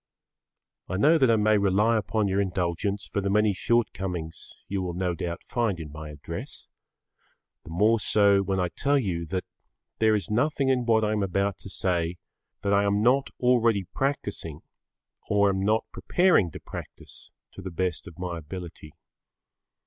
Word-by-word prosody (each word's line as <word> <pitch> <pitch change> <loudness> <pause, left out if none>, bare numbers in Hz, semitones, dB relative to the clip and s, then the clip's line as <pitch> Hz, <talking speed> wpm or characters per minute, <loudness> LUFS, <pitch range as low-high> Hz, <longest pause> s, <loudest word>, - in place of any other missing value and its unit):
I 95 - -2
know 155 - +5
that 130 -3 +4
I 115 - +5
may 105 -1 +3
rely 100 +4 +3
upon 105 0 0
your 95 +1 +1
indulgence 95 +2 -2
for 100 - -2
the 100 - -1
many 105 +1 +3
shortcomings 90 -7 -2 0.2
you 100 -1 -2
will 90 -2 -4
no 90 -1 -1
doubt 85 +1 -5
find 115 -8 -1
in 75 -3 -7
my 75 +1 -8
address, 75 -1 -8 0.9
the - - -12
more 105 +7 +3
so 100 -1 +4
when 95 0 -1
I 90 -1 0
tell 140 +9 +1
you 90 -9 -2
that 90 +2 -2 0.6
there 110 -1 +4
is 105 - -2
nothing 135 +5 +1
in 125 -2 +1
what 110 -1 +4
I 105 - +1
am 105 -1 0
about 100 +1 -1
to - - -10
say 90 -2 -1 0.5
that 100 - +1
I 100 0 +4
am 100 +1 +1
not 130 +3 +3
either - - -30
already 115 -5 +3
practising 100 - -3 0.7
or 100 -1 +4
am 95 -1 0
not 110 +2 +2
preparing 175 - +3
to - - -9
practise - - -10 0.2
to - - -10
the 95 - -5
best 90 -1 -3
of 85 - -12
my 90 -2 -4
ability. 80 -1 -9
100 Hz, 175 wpm, -26 LUFS, 90-110 Hz, 0.9 s, know